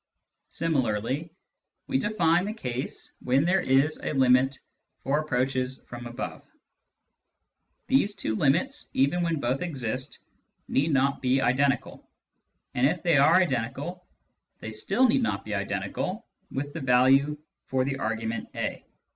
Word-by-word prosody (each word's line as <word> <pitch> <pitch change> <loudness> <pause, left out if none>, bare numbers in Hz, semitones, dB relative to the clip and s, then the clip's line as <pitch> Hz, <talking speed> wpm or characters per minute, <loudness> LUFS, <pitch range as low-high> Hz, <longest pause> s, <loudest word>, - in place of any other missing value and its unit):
Similarly 135 -1 -1 0.6
we 265 - 0
define 180 -4 +2
the 210 - -3
case 125 - -4
when 135 +4 +2
there 190 +2 +3
is 140 +1 +2
a - - -2
limit 130 0 +4 0.5
for 140 +3 +1
approaches 130 -2 -1
from 120 0 -7
above. 120 +2 -6 1.4
These 210 -6 +2
two 150 - -2
limits, 175 - +1
even 140 +7 +2
when 165 -3 0
both 130 +1 -1
exist, 130 -7 -3 0.5
need 145 +4 +1
not 135 0 +2
be 130 +1 +2
identical; 135 +1 0 0.6
and 125 +2 +3
if 165 +3 -2
they 170 -4 +4
are 145 +5 +6
identical, 150 +2 -1 0.5
they 110 - -6
still 195 - +2
need 260 +3 +3
not 230 - -1
be 105 - -4
identical 100 0 -3 0.2
with 145 +2 -4
the 165 - -5
value 135 +3 +4 0.3
for 130 -1 +1
the 135 0 -2
argument 110 +1 -3
a. - - -3
135 Hz, 135 wpm, -27 LUFS, 125-165 Hz, 1.4 s, are